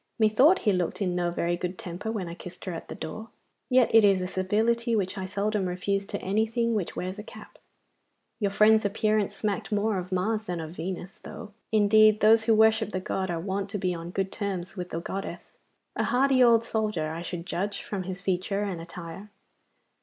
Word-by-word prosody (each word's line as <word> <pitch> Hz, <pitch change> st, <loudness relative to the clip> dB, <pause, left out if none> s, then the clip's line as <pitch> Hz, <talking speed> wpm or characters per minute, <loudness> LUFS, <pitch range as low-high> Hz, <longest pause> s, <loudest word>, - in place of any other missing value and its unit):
Methought 240 Hz, -, +5 dB
he 205 Hz, -, +4 dB
looked 180 Hz, -2 st, -1 dB
in 185 Hz, -3 st, 0 dB
no 175 Hz, -1 st, 0 dB
very 170 Hz, 0 st, -1 dB
good 180 Hz, +1 st, -4 dB
temper 205 Hz, +1 st, -5 dB
when 200 Hz, -6 st, -3 dB
I 170 Hz, -, -6 dB
kissed 180 Hz, +1 st, -10 dB
her 185 Hz, -, -3 dB
at 165 Hz, -, -7 dB
the -, -, -7 dB
door. 220 Hz, +7 st, -7 dB, 0.4 s
Yet 255 Hz, -3 st, +4 dB
it 225 Hz, -1 st, +8 dB
is 195 Hz, -2 st, +5 dB
a 185 Hz, -, -2 dB
civility 225 Hz, +6 st, +1 dB
which 195 Hz, -2 st, -1 dB
I 190 Hz, -2 st, -4 dB
seldom 200 Hz, 0 st, -1 dB
refuse 195 Hz, +2 st, -1 dB
to 205 Hz, -, -4 dB
anything 220 Hz, +4 st, +1 dB
which 205 Hz, -6 st, -2 dB
wears 185 Hz, +3 st, -4 dB
a -, -, -6 dB
cap. -, -, -13 dB, 0.8 s
Your 205 Hz, -3 st, +1 dB
friend's 215 Hz, +2 st, +5 dB
appearance 210 Hz, 0 st, +1 dB
smacked 205 Hz, 0 st, -2 dB
more 210 Hz, -1 st, +1 dB
of 180 Hz, +1 st, -7 dB
Mars 215 Hz, +4 st, 0 dB
than 175 Hz, -4 st, -3 dB
of 160 Hz, -1 st, -6 dB
Venus, 180 Hz, +2 st, -5 dB
though, 210 Hz, -, -10 dB, 0.2 s
indeed, 215 Hz, 0 st, +5 dB
those 220 Hz, +1 st, +5 dB
who 225 Hz, -1 st, +4 dB
worship 220 Hz, 0 st, +4 dB
the 185 Hz, -, 0 dB
god 190 Hz, 0 st, -3 dB
are 170 Hz, -1 st, -2 dB
wont 195 Hz, +3 st, -3 dB
to 205 Hz, -, -3 dB
be 185 Hz, -2 st, -1 dB
on 170 Hz, 0 st, -6 dB
good 190 Hz, +1 st, -2 dB
terms 195 Hz, -3 st, -4 dB
with 180 Hz, -2 st, -5 dB
the 165 Hz, -, -3 dB
goddess. 195 Hz, +3 st, -6 dB, 0.4 s
A -, -, 0 dB
hardy 260 Hz, 0 st, +4 dB
old 230 Hz, -1 st, +5 dB
soldier, 210 Hz, -9 st, -1 dB
I 165 Hz, +1 st, -5 dB
should 175 Hz, 0 st, -5 dB
judge, 200 Hz, +3 st, -3 dB
from 200 Hz, -2 st, -4 dB
his 185 Hz, 0 st, -6 dB
feature 195 Hz, +1 st, -1 dB
and 185 Hz, -5 st, -3 dB
attire. 170 Hz, +4 st, -9 dB
200 Hz, 205 wpm, -27 LUFS, 180-215 Hz, 0.8 s, it